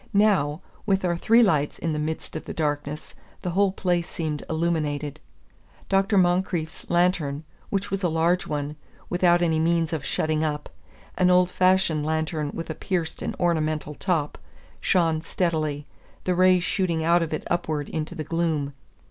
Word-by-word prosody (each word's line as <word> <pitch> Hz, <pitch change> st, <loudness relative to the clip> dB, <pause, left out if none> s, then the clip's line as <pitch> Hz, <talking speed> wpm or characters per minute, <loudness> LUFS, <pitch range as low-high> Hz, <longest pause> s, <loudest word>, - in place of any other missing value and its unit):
Now, 185 Hz, -7 st, +3 dB, 0.3 s
with 195 Hz, -2 st, +2 dB
our 175 Hz, -1 st, +1 dB
three 230 Hz, +7 st, +5 dB
lights 150 Hz, -8 st, +1 dB
in 165 Hz, -2 st, -2 dB
the 150 Hz, -, -2 dB
midst 155 Hz, +2 st, -4 dB
of 155 Hz, -, -5 dB
the -, -, -6 dB
darkness, 145 Hz, -1 st, -3 dB, 0.3 s
the 180 Hz, -, -1 dB
whole 195 Hz, +2 st, +3 dB
place 175 Hz, -3 st, -1 dB
seemed 155 Hz, -3 st, -3 dB
illuminated. 155 Hz, -3 st, -1 dB, 0.7 s
Dr. 195 Hz, +1 st, +3 dB
Moncrieff's 175 Hz, -3 st, 0 dB
lantern, 170 Hz, -5 st, +1 dB, 0.3 s
which 195 Hz, 0 st, -2 dB
was 195 Hz, 0 st, -1 dB
a 180 Hz, -, +1 dB
large 165 Hz, +3 st, +1 dB
one, 145 Hz, 0 st, -3 dB, 0.3 s
without 175 Hz, -1 st, +4 dB
any 160 Hz, -2 st, +2 dB
means 165 Hz, 0 st, +1 dB
of 155 Hz, -4 st, -2 dB
shutting 155 Hz, +2 st, 0 dB
up, 150 Hz, -1 st, -2 dB, 0.5 s
an 180 Hz, -1 st, +5 dB
old 180 Hz, 0 st, +4 dB
fashioned 185 Hz, -5 st, +3 dB
lantern 155 Hz, -1 st, -1 dB
with 165 Hz, -1 st, -5 dB
a -, -, -2 dB
pierced 170 Hz, -1 st, -3 dB
and -, -, -3 dB
ornamental 155 Hz, -3 st, 0 dB
top, 160 Hz, -3 st, -1 dB, 0.4 s
shone 165 Hz, -3 st, +2 dB
steadily, 155 Hz, -4 st, -1 dB, 0.4 s
the 185 Hz, -, +1 dB
rays 185 Hz, 0 st, +4 dB
shooting 170 Hz, -2 st, 0 dB
out 170 Hz, +2 st, +4 dB
of 165 Hz, -, -2 dB
it 155 Hz, -, -3 dB
upward 155 Hz, -4 st, -1 dB
into 155 Hz, -1 st, -4 dB
the 155 Hz, -, -4 dB
gloom. 155 Hz, -3 st, -1 dB
165 Hz, 165 wpm, -25 LUFS, 155-180 Hz, 0.7 s, three